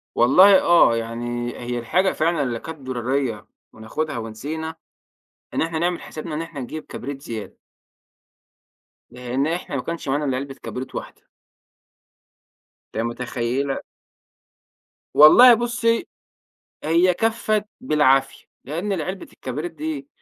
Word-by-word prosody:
والله 185 +11 +7
آه، 170 -9 +5
يعني 120 +1 -4
هي 120 0 -3
الحاجة 180 +11 +1
فعلًا 160 -2 +1
اللي 120 -3 -2
كانت 160 +5 -8
ضرورية 125 -4 -2 0.3
وناخدها 120 +7 -4
ونسينا، 145 +9 -5 0.8
إن - - +1
إحنا 165 0 -2
نعمل 175 +1 0
حسابنا 155 0 -7
إن 155 - -2
إحنا 165 -4 -7
نجيب 155 +5 -6
كبريت 135 +1 -7
زيادة. 110 -6 -7 1.5
لأن 125 +3 -2
إحنا 165 -3 -3
ما 130 - -1
كنش 170 +1 -5
معانا 145 +2 0
إلا 130 -2 0
علبة 135 0 -5
كبريت 130 +1 -6
واحدة. - - -8 1.7
ت - - -7
متخيلة 125 +3 -2 1.3
والله 240 +12 +9
بُصي 235 +3 0 0.8
هي 170 +3 +3
كفّت 215 0 0
بالعافية، 135 - +2 0.2
لأن 170 +9 -3
العلبة 185 +2 -4
الكبريت 150 +7 -5
دي 300 -3 -5
150 Hz, 120 wpm, -22 LUFS, 125-175 Hz, 1.7 s, والله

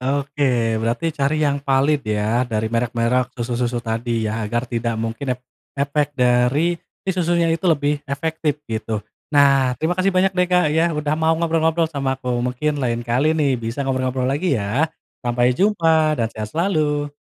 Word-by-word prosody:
Oke. 130 -4 0
Berarti 120 +9 -1
cari 150 +1 0
yang 140 -1 0
valid 140 +2 +2
ya 105 +3 +1
dari 110 +1 -2
merek-merek 120 +1 0
susu-susu 120 0 -2
tadi 115 0 -1
ya, 110 +1 -2
agar 120 +2 -1
tidak 115 -2 -2
mungkin 115 +3 -3
ep - - -32 0.4
efek 145 +1 -1
dari 125 +7 +3 0.3
si 190 - 0
susunya 170 -2 +1
itu 165 - -1
lebih 145 -2 +1
efektif 150 +1 -2
gitu. 110 -2 -4 0.3
Nah, 140 -3 +4
terima 160 +2 0
kasih 185 +2 +1
banyak 185 +1 +2
deh, 180 0 +2
Kak 180 -2 +3
ya, 160 +1 +3
udah 150 0 0
mau 160 0 +3
ngobrol-ngobrol 165 0 +1
sama 135 -4 -2
aku. 125 -1 -3
Mungkin 135 +4 -1
lain 120 -1 -1
kali 135 +7 +1
nih 135 -5 +1
bisa 115 +5 -3
ngobrol-ngobrol 130 -1 -1
lagi 145 0 +1
ya. 115 +10 0 0.3
Sampai 120 0 +2
jumpa 160 -3 +2
dan 115 -3 0
sehat 110 -1 -5
selalu. 150 - 0
135 Hz, 165 wpm, -21 LUFS, 120-155 Hz, 0.4 s, Nah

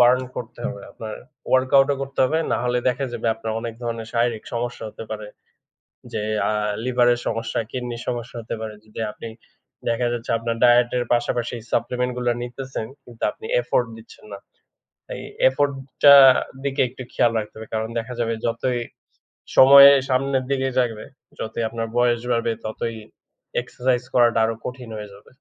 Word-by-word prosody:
Burn 125 +1 +6 0.2
করতে 120 0 -7
হবে। 100 -5 -6
আপনার 110 -1 -7 0.4
ওয়ার্কআউট 130 +1 +4
ও - - 0
করতে 135 0 -8
হবে, 155 +5 +1
না - - +1
হলে 125 0 +1
দেখা 125 +2 -1
যাবে 120 -1 -4
আপনার 110 0 -5
অনেক 115 -1 -5
ধরনের 115 -1 -4
শারীরিক 115 -2 0
সমস্যা 120 +1 -3
হতে 110 - -9
পারে। 105 -1 -5 0.9
যে - - -1 0.3
আ - - +1 0.3
লিভারের 120 -1 +3
সমস্যা 115 0 -2
কিডনির 120 -2 -5
সমস্যা 120 -1 -4
হতে 115 - -5
পারে। 110 -1 -5
যদি 110 - -11
আপনি 110 - -9 0.6
দেখা 120 +1 +1
যাচ্ছে 120 -1 -4
আপনার 115 0 -2
ডায়েট 120 0 +6
এর 120 - 0
পাশাপাশি 120 0 -1 0.2
সাপ্লিমেন্ট 125 +2 0
গুলা 120 -1 +1
নিতেসেন 125 -2 -6 0.2
কিন্তু 120 -3 -12
আপনি 440 - -13 0.2
এফোর্ট 125 - 0
দিচ্ছেন 110 -1 -15
না। - - -6 0.8
এই - - -6 0.3
এফোর্ট 140 +2 0 0.3
টা 140 -1 +11 0.5
দিকে 140 -1 0
একটু 130 +1 -9
খেয়াল 120 - +3
রাখতে 105 - -7
হবে, 110 0 -8
কারণ 110 0 -1
দেখা 120 +2 -6
যাবে 115 -1 0
যতই 120 +2 -1 0.8
সময় 140 +1 +10 0.2
সামনের 135 0 +1
দিকে 135 -1 +1
জাগবে, 115 -4 -1 0.3
যতই 110 +1 -3
আপনার 115 0 -4
বয়স 120 -1 +3
বাড়বে 115 -1 +1
ততই 115 +1 -3 0.7
এক্সারসাইজ 125 0 -1
করাটা 120 -2 +4
আরো 115 0 -2
কঠিন 125 -1 -6
হয়ে 105 -1 -7
যাবে। 100 - -17
120 Hz, 165 wpm, -22 LUFS, 115-125 Hz, 0.9 s, টা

